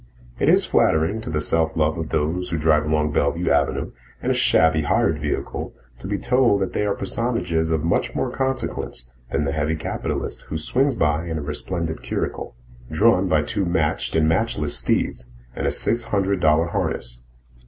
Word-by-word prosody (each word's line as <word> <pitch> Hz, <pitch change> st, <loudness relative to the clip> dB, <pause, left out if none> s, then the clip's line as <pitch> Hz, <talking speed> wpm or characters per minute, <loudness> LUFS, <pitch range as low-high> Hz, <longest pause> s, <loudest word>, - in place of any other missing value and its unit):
It -, -, +3 dB
is -, -, +4 dB
flattering 80 Hz, +8 st, +2 dB
to 110 Hz, -, -6 dB
the 75 Hz, -1 st, -1 dB
self 80 Hz, +1 st, +1 dB
love 80 Hz, +1 st, +2 dB
of 80 Hz, -2 st, -4 dB
those 80 Hz, +4 st, -1 dB
who 85 Hz, -, -1 dB
drive 75 Hz, -1 st, +3 dB
along 75 Hz, -1 st, +1 dB
Bellevue 80 Hz, +4 st, 0 dB
Avenue 70 Hz, -1 st, +1 dB, 0.3 s
in -, -, +1 dB
a -, -, +3 dB
shabby 80 Hz, -1 st, +3 dB
hired 75 Hz, +1 st, +1 dB
vehicle 75 Hz, 0 st, -4 dB, 0.2 s
to 95 Hz, -, -7 dB
be 100 Hz, 0 st, -1 dB
told 125 Hz, -4 st, +2 dB
that 95 Hz, -, -2 dB
they 105 Hz, -, 0 dB
are 100 Hz, -, 0 dB
personages 95 Hz, -7 st, -1 dB
of 80 Hz, -2 st, 0 dB
much 85 Hz, -, 0 dB
more -, -, -1 dB
consequence 130 Hz, -, -3 dB, 0.2 s
than 75 Hz, -, 0 dB
the 70 Hz, -, -1 dB
heavy 75 Hz, +2 st, -1 dB
capitalist 80 Hz, -, -4 dB
who 80 Hz, -, -2 dB
swings 130 Hz, -, +1 dB
by 75 Hz, -3 st, 0 dB
in 80 Hz, -1 st, -3 dB
a 75 Hz, -, -4 dB
resplendent 80 Hz, +2 st, -3 dB
curricle, -, -, -4 dB, 0.3 s
drawn 95 Hz, +3 st, +3 dB
by 75 Hz, -3 st, +2 dB
two 100 Hz, +7 st, -1 dB
matched 85 Hz, -4 st, 0 dB
and 80 Hz, -1 st, +3 dB
matchless 80 Hz, -4 st, 0 dB
steeds, -, -, -1 dB, 0.3 s
in -, -, -2 dB
a -, -, +2 dB
six 115 Hz, +1 st, +1 dB
hundred 100 Hz, -3 st, 0 dB
dollar 80 Hz, +1 st, +3 dB
harness. -, -, -3 dB
80 Hz, 185 wpm, -22 LUFS, 75-95 Hz, 0.3 s, is